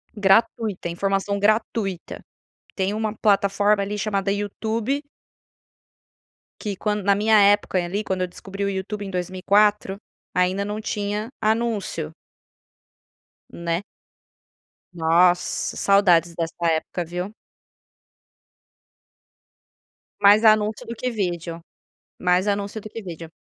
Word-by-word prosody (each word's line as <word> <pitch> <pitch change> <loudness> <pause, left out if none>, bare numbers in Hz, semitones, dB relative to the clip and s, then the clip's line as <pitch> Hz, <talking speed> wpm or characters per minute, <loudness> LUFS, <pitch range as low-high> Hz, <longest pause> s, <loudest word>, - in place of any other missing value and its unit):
Gratuita, 210 -2 +2
informação 195 +3 -1
gratuita, 210 -3 -1 0.6
tem 195 +1 0
uma 215 0 -2
plataforma 200 0 +3
ali 205 +1 -3
chamada 200 -1 -1
YouTube. 220 +6 -2 1.6
Que 205 -2 -3
quando 210 +1 -2
na 200 0 +4
minha 215 +1 +4
época 200 -2 +3
ali 195 +5 -3
quando 190 -2 -2
eu 180 - 0
descobri 195 +2 -6
o - - 0
YouTube 200 +2 -4
em - - -6
2004, 195 +2 +1 0.4
ainda 185 +2 +1
não 210 +1 -4
tinha 210 +1 -3
anúncio. 215 -8 -1 1.4
Né. 170 +2 -3 1.1
Nossa, 175 +2 +2
saudades 175 -4 +4
dessa 165 0 -3
época 165 +2 0
viu. 180 +5 -5 2.9
Mais 205 +2 +6
anúncio 215 -1 +3
do 235 - -6
que 250 +3 -2
vídeo, 175 -6 -3 0.6
mais 180 +2 +2
anúncio 200 +1 -1
do 215 - -9
que 225 - -7
vídeo. 170 -4 -8
200 Hz, 110 wpm, -23 LUFS, 180-210 Hz, 2.9 s, Mais